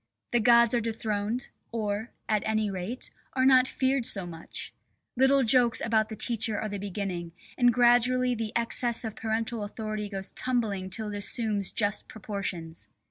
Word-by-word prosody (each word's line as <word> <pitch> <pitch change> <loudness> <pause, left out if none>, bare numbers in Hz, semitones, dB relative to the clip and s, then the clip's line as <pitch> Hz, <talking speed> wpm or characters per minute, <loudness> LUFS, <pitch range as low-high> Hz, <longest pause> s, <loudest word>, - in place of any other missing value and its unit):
The 240 - +3
gods 235 +1 +5
are 240 - +2
dethroned, 220 +1 -2 0.2
or, 215 0 -2 0.2
at 215 -2 +1
any 215 -1 0
rate, 195 +7 -5 0.2
are 260 0 +2
not 260 -1 +6
feared 265 0 0
so 195 -5 +5
much; 165 -1 -7 0.4
little 265 +2 +4
jokes 240 0 +4
about 220 -1 +1
the 220 - -6
teacher 220 -1 +1
are 215 - -3
the 205 0 -4
beginning, 190 -4 -4 0.2
and 245 -1 +4
gradually 245 +1 +3
the 225 -2 -3
excess 235 0 +1
of 220 - -5
parental 225 +1 -2
authority 215 0 -5
goes 195 -1 -1
tumbling 215 -7 -1
till 210 +3 -4
it - - -3
assumes 205 -1 0
just 205 -1 -1
proportions. 190 -6 -6
220 Hz, 160 wpm, -28 LUFS, 205-240 Hz, 0.4 s, not